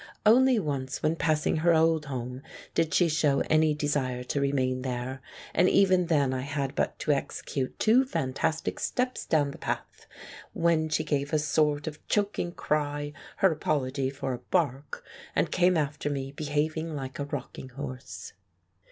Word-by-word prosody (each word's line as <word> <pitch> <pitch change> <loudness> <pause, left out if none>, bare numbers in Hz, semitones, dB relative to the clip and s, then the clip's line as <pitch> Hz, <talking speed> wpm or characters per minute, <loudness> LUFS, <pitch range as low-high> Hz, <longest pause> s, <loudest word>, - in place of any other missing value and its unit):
Only 255 +3 +6
once 140 -8 -3
when 155 +1 +2
passing 155 -1 +1
her 170 +1 +4
old 160 -1 +3
home 125 -1 -5 0.3
did 165 -1 +1
she 175 - +4
show 150 -3 +2
any 155 -1 +4
desire 140 -4 -1
to 140 +3 -2
remain 130 -2 0
there, 130 0 -4 0.3
and 180 +2 +4
even 185 -3 +4
then 145 -5 +2
I 130 - -2
had 140 0 -3
but - - -1
to 150 - +1
execute 135 -1 -2
two 235 +4 +5
fantastic 155 - -1
steps 250 0 -1
down 145 -3 +2
the - - -11
path, - - -5 0.5
when 165 -2 +2
she 155 - +1
gave 145 -1 -1
a - - +5
sort 150 -1 +1
of 150 -1 -7
choking 205 -4 0
cry, 145 -2 -2 0.3
her 190 - +6
apology 140 -3 -1
for 135 -1 -4
a 120 - -5
bark, 140 +1 -1 0.3
and - - +1
came 180 -1 +3
after 145 -1 -1
me 135 -1 -3
behaving 155 +2 -2
like 135 -1 -6
a 140 - -1
rocking 130 -2 -6
horse. 130 -1 -7
150 Hz, 160 wpm, -28 LUFS, 135-160 Hz, 0.5 s, Only